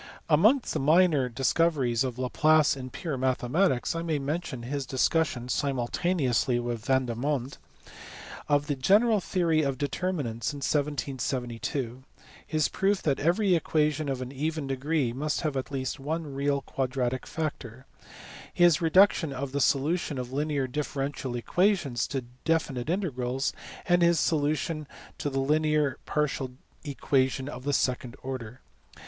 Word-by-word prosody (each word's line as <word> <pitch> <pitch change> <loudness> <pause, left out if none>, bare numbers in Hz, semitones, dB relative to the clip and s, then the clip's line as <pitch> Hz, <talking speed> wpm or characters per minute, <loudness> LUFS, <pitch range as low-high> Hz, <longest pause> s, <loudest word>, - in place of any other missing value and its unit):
Amongst 215 - +4
the 155 - -1
minor 155 -2 +4
discoveries 135 -1 +1
of 125 -2 -3
Laplace 150 +4 +3
in 130 -1 -7
pure 145 -1 -4
mathe 130 -1 0
matics 165 -4 +2
I 165 - -2
may 165 -2 -1
mention 140 -3 -3
his 135 +2 -3
discussion 130 -2 +1
(simultaneously 130 -1 0
with 120 -1 -4
Yan 130 -1 +3
dermonde) 130 +2 -2 0.9
of 145 0 +3
the 145 -1 -1
general 210 - +4
theory 170 -4 +1
of 140 -3 -1
determinants 145 -5 -2
in - - -6
1772; 130 -3 -2 0.4
his 155 -2 +1
proof 195 0 0
that 140 -3 +1
every 180 +5 +2
equation 155 -2 +1
of 130 -1 -2
an 125 - -8
even 155 +2 -2
degree 135 -1 -1
must 150 +4 -2
have 150 -3 -2
at 130 0 -3
least 135 -1 -3
one 150 +1 -3
real 140 0 0
quadratic 130 -1 -2
factor; 135 -6 -5 0.7
his 175 -1 +4
reduction 170 -1 +4
of 135 0 -4
the 140 +1 -1
solution 150 +3 +1
of 125 0 -5
linear 145 -1 0
differential 135 -1 -3
equations 155 - +1
to 135 -3 -3 0.2
definite 155 -5 0
integrals; 135 -8 -1 0.3
and 175 0 +3
his 170 -1 +4
solution 155 0 0 0.4
of 145 - -1
the 135 - -1
linear 150 0 +1
partial 150 -3 0
differential 130 +3 -12
equation 135 -1 0
of 130 -3 -7
the 145 - +1
second 125 -2 0
order. 130 -2 -6
140 Hz, 140 wpm, -28 LUFS, 130-155 Hz, 0.9 s, Amongst